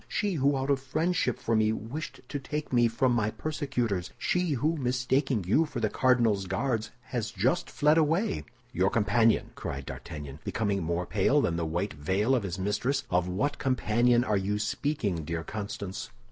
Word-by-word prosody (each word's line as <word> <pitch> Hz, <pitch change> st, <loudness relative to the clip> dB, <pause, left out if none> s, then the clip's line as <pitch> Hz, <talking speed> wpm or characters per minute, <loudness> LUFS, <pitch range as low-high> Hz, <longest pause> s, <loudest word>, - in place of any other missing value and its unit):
She 205 Hz, -2 st, -1 dB
who 140 Hz, -3 st, +2 dB
out 135 Hz, +1 st, 0 dB
of 140 Hz, -, +2 dB
friendship 155 Hz, 0 st, 0 dB
for 115 Hz, -, 0 dB
me 110 Hz, 0 st, +3 dB
wished 115 Hz, +8 st, -5 dB
to 145 Hz, -, -3 dB
take 150 Hz, +1 st, -4 dB
me 120 Hz, -1 st, +5 dB
from 120 Hz, +3 st, +1 dB
my 110 Hz, -3 st, +1 dB
persecutors. 125 Hz, -, -2 dB
She 180 Hz, -3 st, 0 dB
who, 150 Hz, +6 st, +1 dB
mistaking 125 Hz, -, 0 dB
you 110 Hz, -, +3 dB
for 140 Hz, -5 st, -5 dB
the 110 Hz, -2 st, 0 dB
cardinal's 115 Hz, -7 st, +2 dB
Guards, 110 Hz, +3 st, -1 dB
has 120 Hz, -3 st, -3 dB
just 120 Hz, -, 0 dB
fled 150 Hz, +2 st, +3 dB
away." 160 Hz, -, +1 dB, 0.3 s
"Your 95 Hz, +2 st, +2 dB
companion!" 115 Hz, +2 st, +2 dB
cried 70 Hz, 0 st, -5 dB
D'Artagnan, 75 Hz, -2 st, -7 dB
becoming 100 Hz, -3 st, -1 dB
more 85 Hz, +2 st, -1 dB
pale -, -, +2 dB
than 85 Hz, -, +1 dB
the 85 Hz, -1 st, -1 dB
white 85 Hz, +6 st, -2 dB
veil 95 Hz, -, +1 dB
of 125 Hz, -, +3 dB
his 95 Hz, -3 st, -4 dB
mistress. 115 Hz, +8 st, 0 dB
"Of 90 Hz, 0 st, +2 dB
what 140 Hz, +11 st, -1 dB
companion 120 Hz, -1 st, +3 dB
are 105 Hz, -5 st, +1 dB
you 100 Hz, +2 st, -1 dB
speaking, 105 Hz, -, -1 dB
dear 80 Hz, +2 st, -3 dB
Constance?" 100 Hz, -1 st, -5 dB
115 Hz, 175 wpm, -29 LUFS, 95-135 Hz, 0.3 s, me